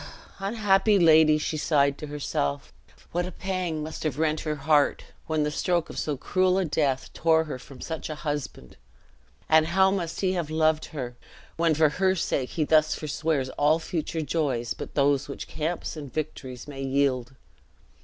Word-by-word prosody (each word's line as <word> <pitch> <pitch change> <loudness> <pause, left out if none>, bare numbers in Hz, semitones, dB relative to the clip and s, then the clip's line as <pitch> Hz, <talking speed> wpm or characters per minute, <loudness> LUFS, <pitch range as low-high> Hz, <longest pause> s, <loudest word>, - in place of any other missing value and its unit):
"Unhappy 205 0 +3
lady!" 160 -3 +6
she 155 +1 -2
sighed 140 -2 +2
to 150 - -6
herself; 135 - -3 0.4
"what 175 +1 -1
a - - -7
pang 180 -4 -3
must 155 +1 -6
have 150 -4 -2
rent 155 0 +1
her 155 -1 -2
heart, 145 0 +2 0.2
when 155 -2 +1
the 150 - -1
stroke 175 +2 0
of - - -5
so 150 -3 -2
cruel 185 +6 +1
a 190 - +1
death 145 -4 -1
tore 160 0 +3
her 150 -5 -6
from 130 +1 -13
such 160 -1 -5
a 155 - -4
husband! 150 -2 -5 0.7
and 160 0 +5
how 190 +2 +4
must 175 -4 -3
he 185 -1 +1
have 170 -4 -2
loved 155 0 +2
her, 125 -5 -6 0.4
when 165 -1 +2
for 155 0 +4
her 185 +5 +1
sake 135 -7 -1
he 160 - -1
thus 155 0 +3
forswears 150 -2 -1
all 150 +2 +4
future 165 -1 -3
joys 135 -6 -1
but - - -8
those 140 0 +2
which 140 - -7
camps 160 +3 -3
and 145 -4 -8
victories 130 -5 -5
may 140 -2 -7
yield! 135 -2 0
155 Hz, 175 wpm, -26 LUFS, 145-165 Hz, 0.7 s, lady